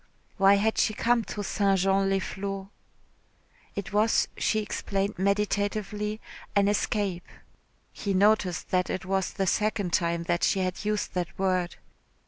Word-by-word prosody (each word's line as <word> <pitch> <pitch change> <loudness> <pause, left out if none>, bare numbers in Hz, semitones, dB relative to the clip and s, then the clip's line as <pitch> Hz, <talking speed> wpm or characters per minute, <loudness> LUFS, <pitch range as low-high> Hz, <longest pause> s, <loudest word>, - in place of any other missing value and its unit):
Why 195 0 +6
had 220 +2 +1
she 215 - +2
come 235 +1 +2
to 205 - -5
St. 195 0 +2
Jean 195 +1 +2
les 195 - +2
Flots? 195 0 -5 1.1
It 200 0 -5
was, 215 +2 +3
she 220 - +1
explained 200 -2 -2
meditatively, 210 +1 -1 0.4
an 200 -1 +4
escape 200 -3 -1 0.7
(he 200 -2 -2
noticed 195 -3 +2
that 180 -1 +1
it 185 - -3
was 190 0 0
the 195 - -1
second 205 -2 0
time 170 -1 +1
that 175 0 -1
she 195 - +2
had 185 +1 -2
used 210 0 -1
that 180 -2 -3
word). 185 -2 0
195 Hz, 145 wpm, -27 LUFS, 185-210 Hz, 1.1 s, Why